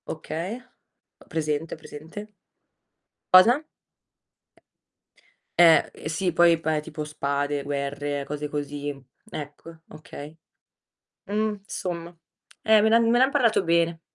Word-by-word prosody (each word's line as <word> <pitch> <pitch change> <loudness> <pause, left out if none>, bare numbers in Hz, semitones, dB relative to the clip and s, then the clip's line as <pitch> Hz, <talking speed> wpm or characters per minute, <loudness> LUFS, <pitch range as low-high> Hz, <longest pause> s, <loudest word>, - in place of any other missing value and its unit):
Okay, 165 +6 -4 0.6
ho - - -19
presente, 155 0 -2
ho - - -16
presente. 160 +7 -10 1.0
Cosa? 235 +11 +7 2.0
Eh, 165 -2 +6 0.2
sì 180 +3 -1
poi, 170 -1 +5
pa 160 -1 0
tipo 155 0 -6
spade, 145 -1 -2
guerre, 145 0 -3
cose 150 +1 -4
così. 145 -1 -4 0.4
Ecco 155 +2 -9
okay. 150 0 -10 0.9
Mhmm, 210 0 -1
insomma, 175 -3 -5 0.5
eh 220 -1 +5
me 220 - +4
l'han 230 +1 +5
me 240 +1 +4
ne 255 - +6
han 265 - +1
parlato 240 -8 +3
bene. 170 0 +1
160 Hz, 115 wpm, -25 LUFS, 145-190 Hz, 2.0 s, Cosa